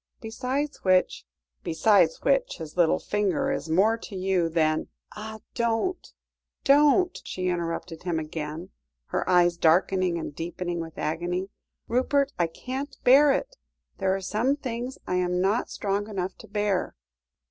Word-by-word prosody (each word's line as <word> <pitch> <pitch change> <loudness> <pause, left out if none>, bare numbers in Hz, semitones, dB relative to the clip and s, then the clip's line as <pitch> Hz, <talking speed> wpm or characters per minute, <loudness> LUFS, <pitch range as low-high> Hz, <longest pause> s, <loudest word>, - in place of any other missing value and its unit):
Besides 260 +6 -3
which 185 - +2 0.2
" - - -51
"Besides 205 - +3
which - - +1
his 160 -2 -8
little 175 -3 +4
finger 210 +7 0
is 220 - -3
more 205 +8 +3
to 220 -3 -9
you 185 -2 +1
than 155 -1 +1
" - - -21
"Ah! 220 0 -8
don't 235 +11 -1 0.5
don't!" 295 +6 +4
she 185 0 -3
interrupted 170 -1 -3
him 175 -2 -2
again, 155 +2 -5 0.4
her - - -1
eyes 175 -1 +4
darkening 175 +2 +3
and 160 - -5
deepening 175 +1 -4
with 165 -1 -7
agony. 175 +5 -2 0.4
"Rupert, 275 +4 +1
I 170 - +3
can't 260 - -6
bear 280 +3 +7
it; - - -2 0.4
there 190 0 +1
are 195 - -4
some 220 +8 +1
things 250 -2 -5
I 180 - -1
am 180 0 0
not 200 +6 +1
strong 205 +1 -2
enough 190 -2 -3
to - - -12
bear." 205 -2 -1
190 Hz, 150 wpm, -26 LUFS, 170-240 Hz, 0.5 s, bear